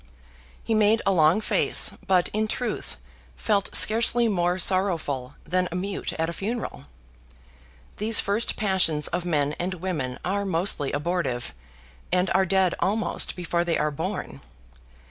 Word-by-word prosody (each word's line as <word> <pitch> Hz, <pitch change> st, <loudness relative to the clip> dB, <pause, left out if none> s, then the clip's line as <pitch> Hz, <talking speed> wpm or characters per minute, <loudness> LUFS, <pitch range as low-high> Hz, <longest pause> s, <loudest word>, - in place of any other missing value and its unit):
He 225 Hz, -, -1 dB
made 215 Hz, +1 st, +4 dB
a 195 Hz, -, +3 dB
long 170 Hz, +3 st, +3 dB
face, -, -, +3 dB, 0.2 s
but, 185 Hz, -2 st, +3 dB
in 215 Hz, +1 st, -1 dB
truth, 245 Hz, +3 st, -4 dB, 0.4 s
felt 205 Hz, -3 st, 0 dB
scarcely 230 Hz, +2 st, +4 dB
more 180 Hz, -3 st, 0 dB
sorrowful 165 Hz, -9 st, -1 dB
than 180 Hz, +2 st, -1 dB
a -, -, -5 dB
mute 195 Hz, +2 st, -3 dB
at 160 Hz, -, -2 dB
a 170 Hz, -, -4 dB
funeral. 200 Hz, -, -5 dB, 1.1 s
These 220 Hz, +1 st, +4 dB
first 205 Hz, +4 st, +1 dB
passions 185 Hz, -8 st, +2 dB
of 175 Hz, 0 st, -3 dB
men 150 Hz, -4 st, 0 dB
and 185 Hz, +2 st, -2 dB
women 160 Hz, -9 st, -4 dB
are 200 Hz, +3 st, -1 dB
mostly 170 Hz, -6 st, 0 dB
abortive; 145 Hz, -, -2 dB, 0.6 s
and 180 Hz, +1 st, +1 dB
are 190 Hz, 0 st, +2 dB
dead 190 Hz, -1 st, +2 dB
almost 210 Hz, +3 st, -1 dB
before 175 Hz, -1 st, -1 dB
they 170 Hz, -1 st, 0 dB
are 150 Hz, -, 0 dB
born. 140 Hz, -, -5 dB
185 Hz, 145 wpm, -25 LUFS, 165-200 Hz, 1.1 s, made